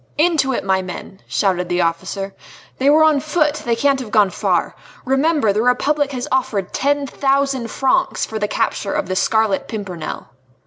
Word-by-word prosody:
"Into 310 -4 +2
it, 255 - -2
my 190 -1 +1
men!" 185 +1 -8
shouted 180 -3 0
the 175 0 +1
officer; 190 +4 -2 0.5
"they 270 +2 +3
were 310 +2 +6
on 310 -2 +4
foot! 300 0 0
They 235 -1 +1
can't 275 +3 +2
have 250 -4 -6
gone 210 -3 +3
far. - - 0 0.3
Remember 270 -3 +2
the 210 - +1
Republic 280 +4 +1
has 250 -1 -4
offered 215 -7 -1
ten 285 0 +1
thousand 275 -3 0
francs 265 +4 +1
for 220 - -5
the 210 - 0
capture 200 -1 -1
of - - -1
the 185 - -2
Scarlet 220 0 +1
Pimpernel." 190 -7 -6
245 Hz, 175 wpm, -19 LUFS, 195-280 Hz, 0.5 s, were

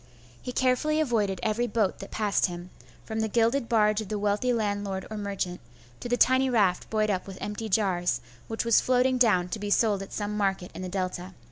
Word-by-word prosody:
He 250 - -5
carefully 260 +5 +1
avoided 215 - 0
every 225 +3 0
boat 215 -5 0
that - - -8
passed 210 -2 +1
him, 175 0 -8 0.3
from 220 0 -4
the 220 - +1
gilded 230 +3 +1
barge 215 -2 +3
of 210 - -8
the 215 - -2
wealthy 205 +4 +1
landlord 205 -4 -2
or - - -4
merchant, 195 -3 -3 0.4
to 240 - -6
the 245 - +2
tiny 260 +1 +4
raft 200 -7 +1
buoyed 215 -1 +1
up 185 -1 -2
with 190 -1 -8
empty 210 +2 -5
jars, 180 - +1 0.3
which 225 +1 -3
was 230 -2 +5
floating 255 0 +2
down 195 -7 +4
to 195 - -4
be 205 0 -4
sold 205 -1 +2
at 195 - -8
some 210 0 -3
market 195 -3 -1
in - - -7
the 185 - -4
Delta. 185 0 -4
210 Hz, 210 wpm, -27 LUFS, 195-230 Hz, 0.4 s, was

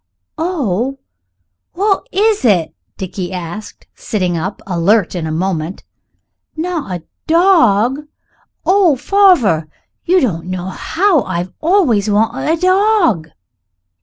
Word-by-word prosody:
"Oh! 270 - -1 0.8
what 400 +1 0
is 425 +1 +1
it?" 190 -9 +2 0.2
Dickie 185 -1 -5
asked, 180 +3 -7
sitting 185 -5 -2
up, 185 +5 -4
alert 190 +2 +1
in 170 -3 -3
a - - -3
moment; 170 +1 -3 0.7
"not 315 - -3
a - - -33 0.2
dawg? 295 - +3 0.6
Oh! 370 -5 +4
farver, 295 - +3 0.4
you 365 +2 +3
don't 175 - -2
know 185 0 -4
how 345 - +1
I've 180 -2 -4
always 310 - +2
wanted 225 +8 +1
a 330 - +1
dawg." 370 - +2
225 Hz, 110 wpm, -16 LUFS, -, 0.8 s, Oh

